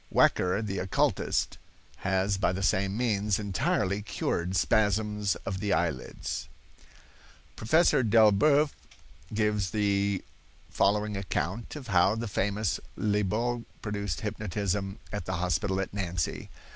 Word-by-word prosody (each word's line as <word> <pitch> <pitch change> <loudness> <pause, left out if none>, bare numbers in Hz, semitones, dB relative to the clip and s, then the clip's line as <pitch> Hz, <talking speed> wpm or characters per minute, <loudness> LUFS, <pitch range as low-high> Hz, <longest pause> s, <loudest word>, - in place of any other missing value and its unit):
Wecker, 90 +4 +3
the 100 -2 -3
occulist, 95 0 0 0.4
has 95 0 0
by 95 - +2
the 95 +1 -3
same 95 +1 +1
means 105 -4 +1
entirely 100 0 0
cured 95 -3 -2
spasms 105 +1 +2
of 95 -1 -3
the 100 0 -1
eye 85 -1 +2
lids." 75 +3 -6 1.1
Professor 150 +4 +3
Delboeuf 115 +7 +5 0.6
gives 105 -3 +1
the 100 -1 +1 0.5
following 105 +3 +1
account 95 - -3
of 135 -5 -8
how 95 +2 +4
the 115 +1 -3
famous 100 -2 -1 0.2
Liebault 110 +3 0 0.2
produced 100 -6 -3
hypnotism 100 -1 -2 0.2
at 105 - -3
the 95 - -3
hospital 90 +2 0
at 95 - -3
Nancy. 90 -5 -2
100 Hz, 120 wpm, -29 LUFS, 95-105 Hz, 1.1 s, Delboeuf